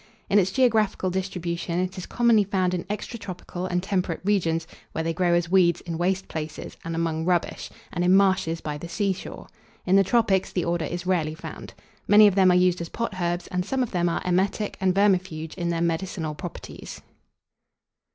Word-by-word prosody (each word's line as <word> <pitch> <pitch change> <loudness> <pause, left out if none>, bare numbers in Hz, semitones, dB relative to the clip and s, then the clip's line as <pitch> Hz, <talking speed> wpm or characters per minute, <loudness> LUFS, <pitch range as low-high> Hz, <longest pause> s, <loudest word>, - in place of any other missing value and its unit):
In 205 - +6
its 190 -1 +2
geographical 215 -6 +2
distribution 175 -2 -3
it 185 +1 -1
is 185 - -7
commonly 235 -3 +4
found 185 -2 0
in 180 - -2
extratropical 195 -3 -5
and 180 0 0
temperate 185 -4 -1
regions, 165 -5 +1 0.3
where 160 - -2
they 165 0 -1
grow 175 0 +2
as 175 0 0
weeds 180 -3 +4
in 170 -1 -5
waste 190 +2 0
places, 155 -1 -6
and 165 0 -4
among 165 -1 -1
rubbish, 175 0 -1 0.2
and 175 - -1
in 180 +1 +5
marshes 185 -4 +2
by 150 -1 -4
the 170 - -8
seashore. 195 +1 -3 0.4
In 190 +1 +4
the 195 - +6
tropics 195 -2 +2
the 180 - -1
order 170 -1 0
is 175 +1 -5
rarely 165 -4 0
found. - - -9 0.3
Many 210 +1 +8
of 205 - +5
them 190 -1 +5
are 180 - +5
used 180 -1 +3
as 170 - -5
potherbs, 180 -6 -2
and 180 -1 0
some 260 +7 0
of 240 - -5
them 175 -2 +1
are 165 - -2
emetic 190 +3 0
and 185 -1 +2
vermifuge 185 -6 +1
in 170 -1 -3
their 165 -1 -1
medicinal 165 -1 -2
properties. 175 +3 -8
180 Hz, 190 wpm, -25 LUFS, 170-195 Hz, 0.4 s, Many